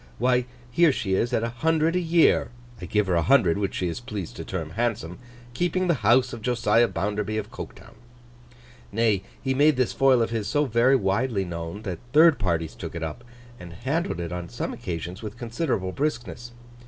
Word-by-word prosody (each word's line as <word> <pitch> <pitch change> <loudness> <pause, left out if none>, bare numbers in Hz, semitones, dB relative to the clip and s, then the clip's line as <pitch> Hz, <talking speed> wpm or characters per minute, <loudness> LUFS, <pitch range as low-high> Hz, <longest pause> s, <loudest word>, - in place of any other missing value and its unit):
Why 125 +1 +2 0.3
here 170 +4 +5
she 100 -7 -2
is 115 +6 +1
at 115 -2 +1
a 115 - -1
hundred 160 +6 +1
a - - +3
year 170 -1 +3 0.3
(I - - -5
give 105 -1 +1
her 95 - 0
a 85 - +3
hundred, 90 - +4
which 100 -2 -2
she 90 - -1
is 85 - -4
pleased 105 -7 -6
to - - -5
term 80 -4 -5
handsome), 105 -5 -2 0.3
keeping 180 +6 0
the 170 - +4
house 125 +4 +4
of 115 - -7
Josiah 115 -1 +3
Bounderby 105 +1 -2
of 105 0 -4
Coketown!' - - -10 1.0
Nay, 110 -2 +2 0.2
he 130 - -1
made 145 +2 +4
this 130 -2 +1
foil 130 -3 +4
of 115 - -3
his 110 -3 -2
so 145 +7 +1
very 120 +2 +3
widely 100 -1 0
known, 85 +4 -6
that 95 -5 -4
third 160 0 +6
parties 85 -4 -1
took - - -8
it 85 - -4
up, 80 +9 -5 0.4
and 85 -1 -10
handled 130 - -2
it 85 -1 -4
on 90 -1 -5
some 120 - -4
occasions 90 -4 -5
with 110 +1 -7
considerable 120 - -2
briskness. 120 -2 -3
115 Hz, 195 wpm, -25 LUFS, 95-130 Hz, 1.0 s, third